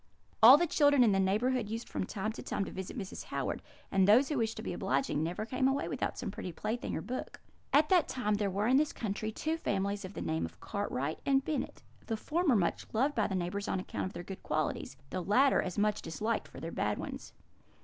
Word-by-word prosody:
All 245 +6 +11
the 345 - +2
children 285 -4 +4
in 225 - +5
the 195 - +2
neighbourhood 215 +4 +1
used 225 +2 -4
from - - -3
time 215 +1 -2
to - - -8
time 195 - -2
to - - -7
visit 190 +4 -6
Mrs. 195 -4 -6
Howard; - - -3 0.3
and 195 -1 +4
those 245 +7 +6
who 295 -4 0
wished 225 -1 -1
to - - -5
be - - -3
obliging 210 - 0
never 175 +6 -2
came 260 +3 +1
away 270 +1 0
without - - -2
some - - -4
pretty 180 - -6
plaything 215 +7 -3
or - - -3
book. 255 +1 -5 0.3
"At 300 +2 +4
that 360 -4 +4
time 230 -5 -1
there 205 -1 +1
were 200 +3 -1
in 255 +3 +5
this 300 +1 +2
country 215 0 -3
two 315 +8 -2
families 200 -7 -1
of 185 +1 -8
the - - -4
name 80 +1 -1
of 85 +3 -6
Cartwright 160 - -3
and 270 -1 +2
Bennet; 310 - -3 0.2
the 225 - -1
former 310 +2 +1
much 180 -5 0
beloved 265 +6 +2
by 215 -5 +1
the 190 - -2
neighbours 185 +3 -2
on - - 0
account 185 - -3
of - - -9
their - - -6
good 190 +1 -8
qualities; 155 -3 -2
the 185 - -2
latter 250 +10 +4
as 180 - -5
much 210 0 +1
disliked 215 +8 -2
for - - -11
their - - -5
bad - - -1
ones. - - -7
215 Hz, 235 wpm, -32 LUFS, 190-260 Hz, 0.3 s, All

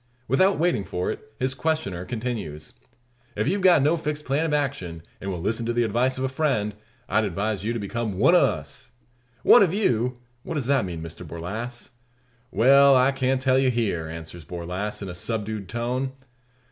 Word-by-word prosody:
Without 185 +10 +3
waiting 165 - +1
for 90 -1 -2
it, 145 - -9
his 130 +1 0
questioner 135 - -2
continues: 110 -11 -5 0.6
"If - - -1
you've 195 +5 +1
got 180 -6 +6
no 155 +4 +3
fixed 150 -1 -4
plan 145 +5 +1
of - - -2
action, 95 - -3 0.2
and 95 - -4
will 90 -3 -3
listen 110 +6 -1
to 120 - 0
the 120 0 +2
advice 120 +4 +1
of 130 - -2
a - - +2
friend, 130 -7 0 0.3
I'd 110 - +2
advise 100 +1 -2
you 110 - -1
to - - -2
become 110 -1 -3
one - - +5
o' - - +6
us." - - -3 0.5
"One 245 - +8
of 190 -2 +3
you! 125 - +1 0.2
What 165 - -5
does 140 -5 -1
that 135 -4 +2
mean, 85 -3 -5
Mr 85 +2 -8
Borlasse?" 105 - -6 0.6
"Well, 140 +4 +6
I 130 +1 +5
can't 130 -1 0
tell 130 0 +4
you 135 -1 +3
here," 105 -10 -1
answers 80 +1 -8
Borlasse, 90 +6 -5
in - - -5
a - - -5
subdued 105 +1 -3
tone. 125 +3 -2
120 Hz, 190 wpm, -25 LUFS, 95-135 Hz, 0.6 s, One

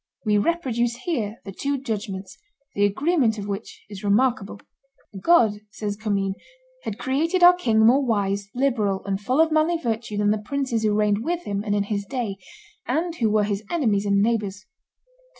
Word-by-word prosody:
We 210 -1 +3
reproduce 240 -5 0
here 230 -11 -2
the 195 - -6
two 280 +8 -2
judgments, 205 -6 -5 0.4
the 205 - +2
agreement 250 - +1
of 205 -1 -5
which 200 +2 -6
is 205 -1 -9
remarkable: 215 0 +1 0.6
"God," 220 - +4
says 205 -1 -4
Commynes, 200 -2 -1 0.5
"had 215 - -5
created 325 +7 0
our 355 +1 +10
king 225 -11 +2
more 260 +5 +5
wise, 200 -4 -1
liberal, 225 -7 0
and 195 0 -2
full 255 +7 0
of 320 0 +4
manly 315 +2 +2
virtue 230 -6 -3
than 205 0 +2
the 215 - 0
princes 255 +1 -2
who 215 -1 +1
reigned 210 0 +1
with 345 +4 -2
him 200 -1 -2
and 205 -1 -1
in 205 - +1
his 200 0 -2
day, 225 -3 -4 0.5
and 325 +7 0
who 225 -3 +2
were 210 0 +3
his 205 0 -2
enemies 215 -11 +1
and 200 0 +3
neighbors. 210 -3 -1
220 Hz, 175 wpm, -24 LUFS, 205-265 Hz, 0.6 s, our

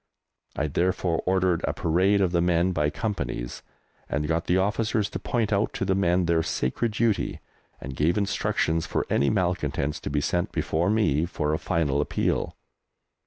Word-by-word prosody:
I 75 - 0
therefore 85 +2 0
ordered 95 -2 +2
a - - -1
parade 95 +5 +2
of 95 -3 +2
the 85 -1 +2
men 90 +1 +2
by 75 -4 +1
Companies, 85 - -4 0.5
and 75 +1 -1
got 80 +1 0
the 90 - +3
officers 105 +2 0
to - - -4
point 115 -3 -1
out 100 +2 +1
to - - -2
the 95 - +2
men 90 -2 +2
their 85 -1 +2
sacred 105 - -1
duty, 110 -1 0 0.4
and 65 +1 -7
gave 80 +7 +1
instructions 80 -5 0
for - - -1
any 70 - +3
malcontents 85 -7 -1
to - - -5
be 75 +1 0
sent 85 +4 -1
before 85 +4 0
me 85 -8 +2
for 75 -3 -1
a 80 - 0
final 75 -5 0
appeal. - - -1
85 Hz, 170 wpm, -26 LUFS, 75-100 Hz, 0.5 s, the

